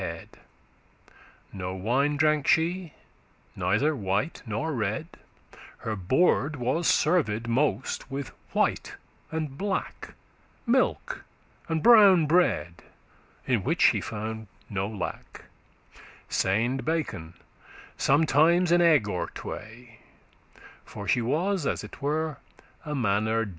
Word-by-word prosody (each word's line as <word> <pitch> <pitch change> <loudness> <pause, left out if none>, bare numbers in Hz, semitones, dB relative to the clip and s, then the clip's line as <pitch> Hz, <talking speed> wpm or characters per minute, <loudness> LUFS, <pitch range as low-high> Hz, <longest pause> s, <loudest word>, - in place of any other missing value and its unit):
from 95 - -2
dancing* 85 0 -8
*hurt - - -19 1.1
No 95 -1 -5
wine 130 +10 0
drank 150 -1 +2
she, 170 0 +1 0.6
neither 100 +12 +1
white 105 - -2
nor 150 +10 -2
red: 110 +3 -2 0.7
Her 110 - -4
board 135 - +2
was 130 +6 -1
served 120 -10 +2
most 130 0 -1
with 135 -2 -5 0.2
white - - 0 0.4
and 155 -4 -4
black, 200 -1 -4 0.5
Milk 265 - 0 0.5
and 160 -1 -1
brown 200 -8 +7
bread, 150 - +1 0.6
in - - +1
which - - +1
she - - +4
found 110 0 -5 0.2
no 100 -1 -1
lack, 105 -4 -7 0.8
Seind* 115 +7 0
bacon, 110 - -3
and - - -28 0.5
sometimes 160 +4 +3
an 175 0 +5
egg 155 -10 +4
or 90 -3 -2
tway; 115 +2 -9
*singed - - -25 0.2
For 100 -2 -9
she 125 - +2
was 160 - 0
as - - -2
it - - -11
were 155 +1 -1 0.5
*a 150 -2 -4
manner 110 -1 +1
dey. - - -8
135 Hz, 120 wpm, -27 LUFS, 110-160 Hz, 1.1 s, brown